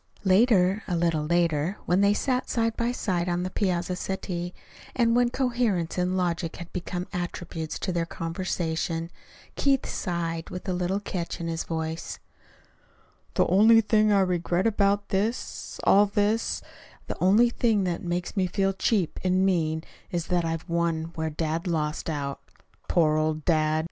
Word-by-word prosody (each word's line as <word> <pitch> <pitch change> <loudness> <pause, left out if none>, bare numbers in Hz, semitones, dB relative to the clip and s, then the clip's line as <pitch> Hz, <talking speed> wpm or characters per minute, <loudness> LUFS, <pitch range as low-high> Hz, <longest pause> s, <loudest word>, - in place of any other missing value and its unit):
Later, 195 -1 +4
a 180 - 0
little 165 -2 +1
later, 170 +1 +1
when 180 +2 +2
they 200 +1 +4
sat 255 +2 0
side 230 -1 0
by 235 +1 0
side 180 -7 -1
on 175 0 0
the 185 - -3
piazza 180 -2 0
settee, 180 -2 -4 0.4
and 235 -2 +3
when 245 0 +4
coherence 240 -10 0
and 180 +1 0
logic 170 -2 -1
had 170 -1 -9
become 180 0 -4
attributes 175 -2 -4
to 190 - -2
their 170 -1 -1
conversation, 165 -1 -3 0.4
Keith 275 -2 +2
sighed, 165 -2 -3
with 180 +2 -7
a 185 - 0
little 180 +2 0
catch 180 -4 -4
in 170 - -3
his 165 0 -2
voice: 160 0 -4 1.2
"The - - +4
only 220 +5 +6
thing 215 -1 +3
I 200 -1 +5
regret 180 0 0
about 205 -2 +2
this 210 +5 -2
all 205 +1 +6
this 205 +2 0 0.4
the - - -4
only 220 +6 +5
thing 225 -5 +2
that 175 -2 -2
makes 175 +2 -3
me 190 -2 +2
feel 195 +2 0
cheap 195 -3 0
and 185 +1 +2
mean, 160 -4 +1 0.3
is 170 -2 -2
that 175 -1 +2
I've 165 0 -3
won 170 -1 -1
where 160 -1 -2
dad 160 +2 -2
lost 155 -2 -1
out. 140 -3 -3 0.5
Poor 155 -3 +3
old 155 0 -1
dad!" 155 -2 +2
180 Hz, 160 wpm, -26 LUFS, 165-200 Hz, 1.2 s, only